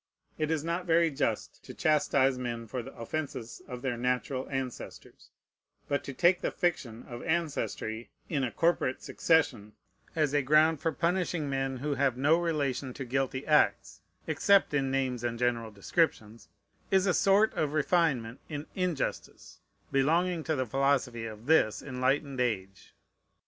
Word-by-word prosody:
It 155 -1 0
is 160 -2 0
not 170 +2 -2
very 165 0 +4
just 125 -6 -2
to - - -10
chastise 140 -3 +2
men 120 -2 -4
for 120 +3 -4
the - - -10
offences 120 -1 -5
of 125 -1 -7
their 125 -3 -1
natural 125 +2 -1
ancestors; 135 -3 -6 0.6
but 140 - -1
to - - -5
take 175 +6 +3
the - - 0
fiction 135 - -2
of 120 0 -7
ancestry 145 -8 -2 0.2
in 145 -5 -1
a 125 - 0
corporate 165 -5 0
succession, 125 -10 +1 0.4
as 150 -3 +1
a 145 - +3
ground 155 +3 +4
for 165 - +1
punishing 170 -3 -1
men 135 -1 -1
who 145 +3 -2
have 135 -2 +1
no 150 +5 +4
relation 140 -6 -1
to 135 - -5
guilty 130 +1 -2
acts, 150 -1 +2 0.2
except 200 -5 +3
in 135 -2 +1
names 130 -3 -1
and 120 -1 -2
general 120 -2 0
descriptions, 110 - -1 0.4
is 190 -1 +3
a 185 - +3
sort 200 +4 +4
of 150 -2 -1
refinement 150 -7 +1
in 150 0 -5
injustice 180 -6 -3 0.3
belonging 165 +5 +2
to 160 - 0
the 130 -2 -1
philosophy 130 -2 0
of 110 +1 -10
this 145 -8 +3
enlightened 135 +1 -1
age. 95 -6 -3
135 Hz, 155 wpm, -29 LUFS, 125-160 Hz, 0.6 s, very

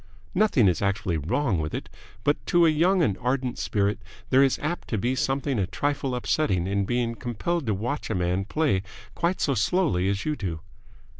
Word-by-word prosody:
"Nothing 170 - +4
is 90 -3 +1
actually 100 -3 0
wrong 95 - 0
with 75 -1 -3
it, - - -5 0.4
but 145 - +1
to 175 -1 +5
a 160 - +5
young 175 +4 +3
and 100 -10 +1
ardent 125 0 -1
spirit 100 0 0 0.3
there 130 +1 +6
is 135 -2 +3
apt 155 +4 -3
to 110 - -1
be 120 +5 0
something 135 -1 0
a 95 - 0
trifle 140 +5 -1
upsetting 120 - 0
in 100 +1 0
being, 120 +1 0
compelled 130 +7 -3
to 105 - +1
watch 120 +9 -3
a 110 - -1
man 90 +2 0
play 140 -5 +1 0.3
quite 175 +2 0
so 140 - +1
slowly 105 - +1
as 100 0 -2
you 155 - 0
do. 85 - -4
120 Hz, 195 wpm, -26 LUFS, 100-145 Hz, 0.4 s, there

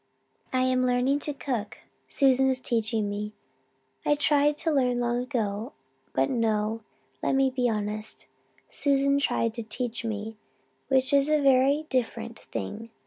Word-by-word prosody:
"I 255 0 +2
am 255 0 +2
learning 250 +3 +2
to 295 0 -3
cook. 240 -7 -3 0.3
Susan 265 -1 +3
is 260 -1 +1
teaching 225 -3 0
me. 210 +1 -4 0.7
I 295 - +3
tried 295 0 +3
to 325 - +1
learn 250 -4 +2
long 240 0 0
ago 230 -2 -3 0.4
but 135 0 +2
no, 220 -1 0 0.4
let - - +1
me 270 -1 +3
be 250 -1 +1
honest 215 0 -3 0.4
Susan 280 0 +2
tried 230 -5 0
to 230 - -5
teach 230 +2 -4
me, 220 -1 -4 0.5
which 265 +1 +2
is 280 +1 +4
a 305 0 +4
very 275 +2 +4
different 230 -2 -2
thing. 225 +2 -6
250 Hz, 145 wpm, -27 LUFS, 225-275 Hz, 0.7 s, is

